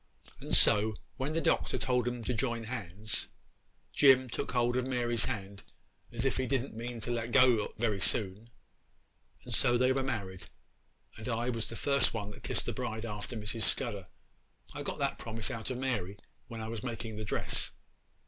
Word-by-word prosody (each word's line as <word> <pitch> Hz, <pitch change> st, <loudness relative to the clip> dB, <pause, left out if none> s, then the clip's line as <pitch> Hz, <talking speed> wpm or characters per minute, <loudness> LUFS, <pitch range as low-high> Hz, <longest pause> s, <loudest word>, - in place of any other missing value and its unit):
'And -, -, 0 dB
so, 105 Hz, +1 st, +5 dB, 0.2 s
when 140 Hz, +3 st, -2 dB
the 165 Hz, -, +2 dB
Doctor -, -, +2 dB
told 125 Hz, -2 st, +1 dB
them 120 Hz, -1 st, -2 dB
to 125 Hz, -, -1 dB
join 115 Hz, 0 st, -1 dB
hands, 105 Hz, -3 st, -2 dB, 0.7 s
Jim 130 Hz, -2 st, +6 dB
took -, -, -2 dB
hold 120 Hz, -1 st, +2 dB
of 125 Hz, 0 st, 0 dB
Mary's 120 Hz, -3 st, +1 dB
hand 100 Hz, -5 st, -4 dB, 0.5 s
as 120 Hz, +1 st, -2 dB
if 135 Hz, -, +1 dB
he 130 Hz, -1 st, 0 dB
didn't 135 Hz, 0 st, -1 dB
mean 115 Hz, +1 st, -5 dB
to 120 Hz, -, -3 dB
let 115 Hz, 0 st, -2 dB
go 125 Hz, -5 st, +5 dB
very 105 Hz, -3 st, 0 dB
soon; 105 Hz, +3 st, 0 dB, 1.0 s
and 125 Hz, -, -6 dB
so 120 Hz, +1 st, +4 dB
they 130 Hz, +1 st, +4 dB
were 135 Hz, -, +1 dB
married, 100 Hz, -8 st, -4 dB, 0.7 s
and 110 Hz, -, -7 dB
I 120 Hz, +1 st, 0 dB
was 115 Hz, -2 st, -2 dB
the 115 Hz, -, -6 dB
first 140 Hz, 0 st, +2 dB
one 105 Hz, -2 st, -3 dB
that -, -, -12 dB
kissed -, -, -1 dB
the -, -, -2 dB
bride 110 Hz, +1 st, -3 dB
after 105 Hz, +2 st, -5 dB
Mrs. 110 Hz, +2 st, -4 dB
Scudder. 105 Hz, -5 st, 0 dB, 0.7 s
I -, -, -5 dB
got -, -, -3 dB
that -, -, -1 dB
promise 115 Hz, +3 st, -2 dB
out 115 Hz, -3 st, -4 dB
of 130 Hz, -, -2 dB
Mary 105 Hz, -7 st, -2 dB, 0.3 s
when 115 Hz, -2 st, -6 dB
I 110 Hz, -, -4 dB
was 115 Hz, -1 st, -4 dB
making 115 Hz, -2 st, -5 dB
the 110 Hz, -, -3 dB
dress. 100 Hz, -, +1 dB
115 Hz, 185 wpm, -32 LUFS, 110-125 Hz, 1.0 s, Jim